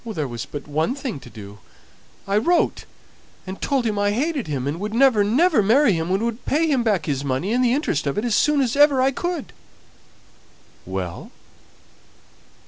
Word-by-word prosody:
"There 175 -11 -4
was 120 -2 -6
but 145 -1 -8
one 155 - -1
thing 260 - -5
to - - -13
do. 105 -1 -11 0.7
I 195 - 0
wrote 340 +11 +1 0.6
and 190 0 -8
told 270 -4 0
him 210 -2 -1
I 205 0 +2
hated 275 - -1
him, 135 -4 -3
and 145 +4 -3
would 210 +2 -4
never, 245 -5 +4
never 270 - +3
marry 230 +3 +4
him, 165 0 -2
and 190 +4 0
would 235 0 -3
pay 315 +3 +1
him 280 -6 +1
back 205 -9 0
his 140 -2 -2
money 140 - -1
and 250 +1 +2
the 240 - +3
interest 155 - -1
on 140 - -2
it 210 - -1
as 235 - 0
soon 295 +5 +3
as 250 -2 0
ever 290 -2 +5
I 265 +1 +3
could." 345 +1 -4 1.3
"Well?" 95 -2 -5
215 Hz, 190 wpm, -22 LUFS, -, 1.3 s, ever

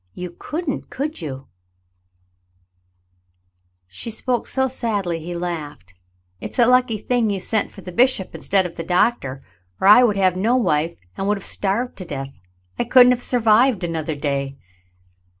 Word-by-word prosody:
You 180 -1 -6
couldn't, 310 -2 -4
could 295 - -4
you 150 -4 -4
.^" 135 +1 -14 2.4
She 95 - -8
spoke 240 +2 -1
so 265 0 +1
sadly, 205 -9 -2
he 175 +2 -6
laughed. 155 - -6 0.5
"It's - - -7
a 240 - +5
lucky 250 -2 +3
thing 235 +1 0
you 200 -1 -1
sent 215 +3 0
for 195 - -13
the 180 - -8
bishop 240 -2 +1
instead 190 -2 +1
of 175 - -7
the 165 - -4
doctor, 175 - 0 0.4
or - - +2
I 210 +5 +9
would 210 -5 +2
have 185 -2 +3
had 185 - -4
no 235 +5 +2
wife 165 -8 0 0.2
and 195 - -3
would 210 0 +1
have 195 - -7
starved 220 +6 -1
to 185 - -6
death. 135 - -7 0.4
I - - +2
couldn't 250 +1 +6
have 250 -1 0
survived 235 -2 +3
another 160 -2 -3
dav." 140 -2 -2
195 Hz, 170 wpm, -21 LUFS, 165-245 Hz, 2.4 s, I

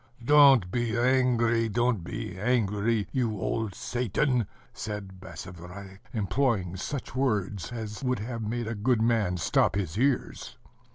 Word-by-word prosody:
"Don't 135 -9 +6
be 120 0 -1
angry, 120 -2 +2
don't 120 -3 +1
be 90 0 -5
angry, 105 0 +1
you 115 -6 -1
old 105 0 -2
Satan!" 125 +1 0 0.3
said 100 -3 -6
Basavriuk, 95 +1 -10
employing 105 -4 0
such 135 +8 -5
words 105 -7 -1
as 110 -1 -6
would 125 -1 +1
have 115 +3 -5
made 115 +2 -2
a 115 - -3
good 110 +2 +1
man 110 -6 +2
stop 85 - +2
his 100 -1 -2
ears. 135 0 -1
110 Hz, 130 wpm, -28 LUFS, 100-125 Hz, 0.3 s, Don't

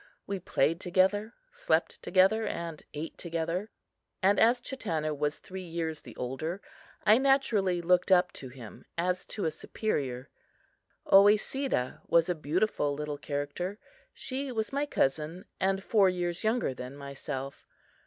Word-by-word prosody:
We 195 -1 -3
played 165 -2 +1
together, 190 +5 +1 0.2
slept - - 0
together 195 +4 +3
and 165 -3 -4
ate 155 +3 -6
together; 170 +4 -2 0.5
and 200 +2 +4
as 235 +2 +5
Chatanna 165 - -2
was 145 +1 -1
three 190 0 -8
years 165 -3 -4
the - - -12
older, 145 +9 -3 0.5
I 215 +2 +7
naturally 220 -10 +2
looked 180 +2 +3
up 180 -1 +5
to 130 - -8
him 120 -4 -11
as 180 +2 0
to 205 - -4
a 160 - +1
superior. 135 - -3 0.8
Oesedah 205 - +4
was 170 +1 +4
a - - +3
beautiful 155 -1 0
little 150 0 -4
character. 145 +7 -3 0.3
She 270 +1 -4
was 220 0 -2
my 285 +1 0
cousin, 155 - 0
and 195 0 +1
four 200 -3 +4
years 175 -1 -2
younger 220 - +1
than 125 +2 -8
myself. 140 -1 -6
180 Hz, 140 wpm, -30 LUFS, 150-210 Hz, 0.8 s, I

